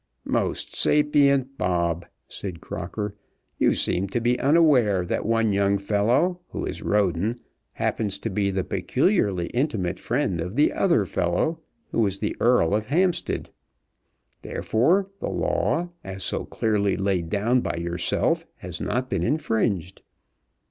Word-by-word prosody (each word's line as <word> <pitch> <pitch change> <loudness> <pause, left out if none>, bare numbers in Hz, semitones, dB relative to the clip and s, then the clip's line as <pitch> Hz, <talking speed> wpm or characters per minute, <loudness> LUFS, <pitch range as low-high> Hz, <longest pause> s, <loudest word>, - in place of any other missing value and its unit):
"Most - - -1
sapient 140 -2 +3
Bobb," 85 -1 0 0.2
said 90 -4 -6
Crocker, 105 +6 -5 0.5
"you - - +3
seem 95 +2 +1
to 100 +5 -1
be 120 +1 +1
unaware 135 - +4
that 90 - -2
one 115 -2 +2
young 100 0 +2
fellow, 110 - +1
who - - -4
is - - -4
Roden, 100 +1 +1 0.4
happens 100 -3 -1
to 115 +2 -4
be 100 +1 0
the 95 -1 -1
peculiarly 105 - +1
intimate 115 - -1
friend 115 - -1
of 90 +5 -5
the 150 - +3
other 170 - +2
fellow, 90 - 0 0.3
who 115 - +2
is 100 0 -1
the - - -2
Earl 115 -7 +3
of 110 +1 0
Hampstead. 175 +5 0 0.9
Therefore 170 - +1
the - - -3
law, 175 +2 0
as 95 0 -5
so - - -1
clearly 100 -4 0
laid 95 -4 0
down 115 +6 +2
by - - -2
yourself, 85 +1 0
has 90 -1 -8
not 125 +1 -1
been - - -1
infringed. 110 - -1
105 Hz, 140 wpm, -24 LUFS, 95-130 Hz, 0.9 s, unaware